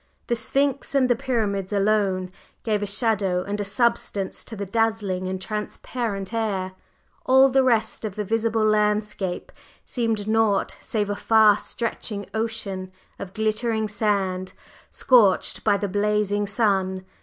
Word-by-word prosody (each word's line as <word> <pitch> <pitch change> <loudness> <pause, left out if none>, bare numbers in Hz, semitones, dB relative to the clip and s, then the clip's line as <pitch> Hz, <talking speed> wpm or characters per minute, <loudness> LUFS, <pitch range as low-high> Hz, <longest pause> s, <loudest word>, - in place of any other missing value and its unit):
The 240 - 0
Sphinx 275 +5 -1
and 265 -2 +4
the 245 - +3
Pyramids 210 -6 -2
alone 195 -3 +1 0.3
gave 210 -2 0
a 205 - -2
shadow 200 -4 0
and 205 +1 -3
a - - 0
substance 205 -2 -1
to 225 - -8
the 200 -1 -4
dazzling 205 -3 0
and 190 0 -3
transparent 210 0 -4
air, 200 -5 -1 0.5
all 265 +1 +6
the 265 +1 +4
rest 235 -4 +1
of 210 -3 -4
the 210 - -2
visible 225 +1 0
landscape 210 -3 0 0.3
seemed 225 -4 -2
naught 220 -2 +1
save 205 -2 -1
a - - -1
far 215 -1 +5
stretching 215 -3 -4
ocean 215 -4 -3 0.3
of 190 0 -8
glittering 220 0 0
sand, 195 -3 -1 0.4
scorched 220 -8 +3
by 205 -2 +3
the 205 - -2
blazing 205 +1 0
sun. 190 -3 0
210 Hz, 140 wpm, -24 LUFS, 195-225 Hz, 0.5 s, all